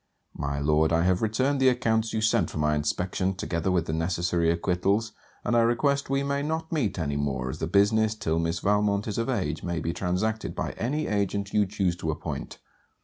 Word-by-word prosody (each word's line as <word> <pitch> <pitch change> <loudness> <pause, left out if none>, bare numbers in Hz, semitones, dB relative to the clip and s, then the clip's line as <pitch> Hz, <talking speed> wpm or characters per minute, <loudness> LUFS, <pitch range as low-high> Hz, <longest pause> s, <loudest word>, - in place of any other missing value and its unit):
My 70 -1 -3
Lord, 75 +2 +2
I 85 0 +3
have 90 0 +2
returned 130 +6 +1
the 130 -1 +6
accounts 115 -3 +1
you 110 - -1
sent 110 - +2
for - - -7
my 75 0 +2
inspection, 90 +5 -1
together 85 0 -2
with 90 -3 +1
the 80 - -3
necessary 85 0 0
acquittals; 95 +6 +1 0.3
and 120 - 0
I - - +5
request 135 +5 +1
we 135 0 +1
may 140 0 -1
not 160 +2 -3
meet 115 - 0
any 70 -4 -1
more, 65 -3 -2
as - - -8
the 80 - -2
business 105 +4 +3
till 80 -6 -1
Miss 85 +1 -1
Valmont 105 0 +1
is 105 +1 -2
of 115 - -1
age 80 - -1
may 85 -2 -2
be 85 +1 -2
transacted 100 +6 -2
by - - -2
any 145 +7 -2
agent 100 -1 -1
you 105 -2 +3
choose 95 -3 0
to 80 - -3
appoint. 75 - -5
95 Hz, 205 wpm, -27 LUFS, 85-110 Hz, 0.3 s, the